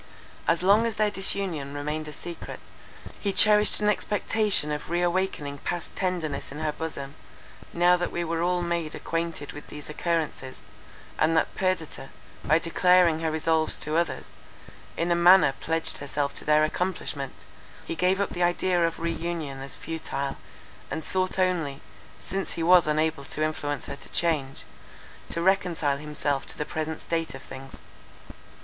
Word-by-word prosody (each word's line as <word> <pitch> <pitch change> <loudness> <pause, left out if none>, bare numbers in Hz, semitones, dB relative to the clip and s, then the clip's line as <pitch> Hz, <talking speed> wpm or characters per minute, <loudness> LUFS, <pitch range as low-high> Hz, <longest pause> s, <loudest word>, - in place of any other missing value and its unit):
As 170 +1 +2
long 205 +5 +5
as 225 - -3
their 210 -1 +2
disunion 185 -8 -1
remained 150 +2 -3
a - - -6
secret, 170 +3 -8 0.6
he 200 - 0
cherished 210 +1 +6
an 210 - +2
expectation 210 -5 +1
of 150 +1 -4
re 175 +1 +1
awakening 175 -6 -1
past 175 -1 -4
tenderness 170 -8 -2
in 145 - -7
her 155 0 -1
bosom; 145 -3 -5 0.6
now 175 +1 +5
that 175 - -2
we 175 - -2
were 165 0 -1
all 175 0 +1
made 170 -3 -2
acquainted 165 -3 -3
with 150 - -10
these 150 0 -8
occurrences, 155 -5 -2 0.6
and 160 +1 +3
that - - +1
Perdita, 185 -7 -2 0.3
by 155 - +4
declaring 170 0 +4
her 160 -1 0
resolves 160 0 +1
to 155 +1 -1
others, 165 -5 -1 0.7
in 170 +1 0
a - - +4
manner 175 -3 +7
pledged 165 0 0
herself 140 0 -2
to - - -4
their 150 0 +5
accomplishment, 155 -5 -3 0.4
he - - -3
gave 180 +3 +2
up 200 - 0
the 175 - -4
idea 175 0 +2
of 165 - -4
re 170 0 -1
union 160 -6 -4
as 135 - -5
futile, 145 -4 -4 0.5
and 160 - -4
sought 185 +2 0
only, 170 -7 +1 0.4
since 195 0 -4
he 165 - -3
was 175 -1 +6
unable 155 -1 +1
to 155 - -2
influence 145 -2 -2
her 140 - -5
to - - -11
change, 150 -6 0 0.7
to 170 - -1
reconcile 175 -7 +2
himself 145 -1 -2
to - - -4
the 150 - -2
present 160 +1 -4
state 165 -3 -2
of 135 - -10
things. 135 0 -10
165 Hz, 165 wpm, -27 LUFS, 150-180 Hz, 0.7 s, manner